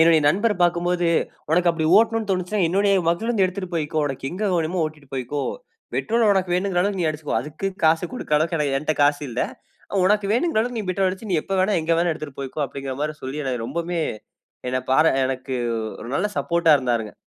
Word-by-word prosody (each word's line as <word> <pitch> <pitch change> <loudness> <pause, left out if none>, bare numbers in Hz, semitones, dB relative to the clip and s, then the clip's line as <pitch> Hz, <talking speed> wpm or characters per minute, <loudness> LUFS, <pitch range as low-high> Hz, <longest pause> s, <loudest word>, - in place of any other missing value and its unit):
என்னுடைய 160 -1 +6
நண்பர 205 +8 +2
பார்க்கும்போது, 175 0 +2 0.4
"உனக்கு 175 +1 +4
அப்படி 160 -1 -1
ஓட்டணும்னு 225 -1 +1
தோனுச்சுன்னா 185 +2 0
என்னுடைய 200 +2 +3 0.2
மகிழுந்து 215 +2 +1
எடுத்துட்டு 185 -1 -6
போய்க்கோ. 155 0 -2
உனக்கு 135 0 -4
எங்க 205 +3 -2
வேணுமோ 170 +1 0
ஓட்டிட்டு 150 -3 -12
போய்க்கோ. 135 +2 -3 0.5
பெட்ரோல 230 -1 +2
உனக்கு 185 -2 0
வேணுங்கிற 185 -1 0
அளவுக்கு 200 -1 -1
நீ 160 - +2
அடிச்சுக்கோ. 150 -1 -4
அதுக்கு 155 +6 -5 0.2
காசு 160 +2 +4
குடுக்கிற 150 -11 0
அளவுக்கு 165 +2 0
ஏன்னா 150 -1 +1
என்ட 155 +1 0
காசு 145 +1 +3
இல்லை. 120 - -1 0.6
உனக்கு 210 0 +2
வேணுங்கிற 250 -3 +2
அளவுக்கு 245 0 -2
நீ 200 - -6
பெட்ரோல் 190 +1 +1
அடிச்சு, 195 +2 -7
நீ - - +3
எப்ப - - -6
வேணாலும், 190 -2 +2
எங்க 160 - -3
வேணாலும், 170 0 +2
எடுத்துட்டு 145 -3 -9
போய்க்கோ." 135 +3 -4
அப்படின்ற 135 -1 -6
மாரி 155 0 -2
சொல்லி 145 +3 -4
எனக்கு 125 -3 -2
ரொம்பவுமே 170 +4 -2 0.7
என்னை 130 0 0
பாரா 155 +5 +5 0.2
எனக்கு 130 0 -4 0.5
ஒரு 115 - -8
நல்ல 195 - +1
சப்போர்ட்டா 170 -2 +3
இருந்தாருங்க. 120 -5 -1
170 Hz, 190 wpm, -23 LUFS, 150-195 Hz, 0.7 s, என்னுடைய